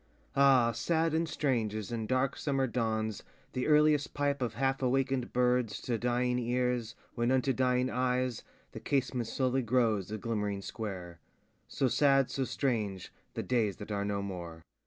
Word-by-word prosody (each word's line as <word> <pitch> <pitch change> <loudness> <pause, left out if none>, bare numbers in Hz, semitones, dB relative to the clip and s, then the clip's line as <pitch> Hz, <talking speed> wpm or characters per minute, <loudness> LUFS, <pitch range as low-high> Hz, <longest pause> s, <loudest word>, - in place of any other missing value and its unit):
Ah, 135 -4 +5
sad 165 +5 0
and 165 0 0
strange 120 -9 0
as 110 0 -5
in 115 -2 -3
dark 130 +2 +1
summer 135 -2 0
dawns 110 -3 -1 0.3
The 125 - -1
earliest 150 -1 +3
pipe 145 -1 0
of 120 -2 -2
half 135 +2 0
awakenŌĆÖd 135 0 0
birds 125 -3 +1
To 120 -3 -2
dying 125 +1 +1
ears, 125 -1 -1 0.2
when 120 0 0
unto 130 +1 +2
dying 125 0 +2
eyes 125 -1 0 0.3
The - - -7
casement 130 -4 -1
slowly 130 +3 0
grows 115 -5 +1
a 110 - -3
glimmering 105 -2 -2
square; 90 -7 -6 0.5
So 135 - 0
sad, 135 0 +3
so 135 - -1
strange, 110 -10 -2 0.2
the - - -2
days 115 -6 +1
that 105 0 -8
are 100 -1 -1
no 100 -1 -2
more. 85 -4 -7
125 Hz, 160 wpm, -31 LUFS, 110-135 Hz, 0.5 s, Ah